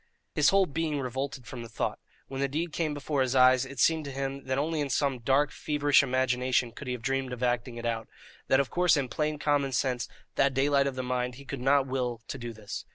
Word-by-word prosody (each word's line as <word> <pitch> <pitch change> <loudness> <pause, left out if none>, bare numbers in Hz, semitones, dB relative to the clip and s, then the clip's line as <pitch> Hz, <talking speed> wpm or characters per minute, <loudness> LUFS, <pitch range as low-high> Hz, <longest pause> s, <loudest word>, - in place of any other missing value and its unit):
His - - +4
whole 195 0 +4
being 155 -1 -2
revolted 130 0 -4
from 120 +1 -7
the 115 - -8
thought; - - -2 0.3
when 135 0 -5
the 140 - +2
deed 155 +4 -3
came 155 -3 -1
before 145 -1 -1
his 130 0 +1
eyes, 130 0 +5
it 140 +1 -10
seemed 160 +3 +3
to 140 - -5
him 135 0 -4
that 130 0 -1
only 155 +2 0
in 145 - -2
some 135 -1 0
dark 135 +5 +2
feverish 145 -1 +3
imagination 130 -2 +1
could 135 - -9
he 125 - -1
have 120 -2 -6
dreamed 135 0 -1
of 125 0 -5
acting 120 0 0
it 120 - -6
out, 115 -1 -2 0.4
that 130 - +4
of 140 - 0
course 180 -3 +4
in 135 -3 -1
plain 150 +2 -1
common 145 -2 +1
sense, 125 0 0 0.3
that 140 -2 +3
daylight 140 +1 +3
of 135 - -3
the 130 - -3
mind, 125 0 -2
he 140 +2 -12
could 135 -2 -6
not 135 +1 +4
will 125 -3 -2
to 135 - -5
do 120 -1 -5
this. 110 -2 -7
135 Hz, 240 wpm, -29 LUFS, 125-145 Hz, 0.4 s, eyes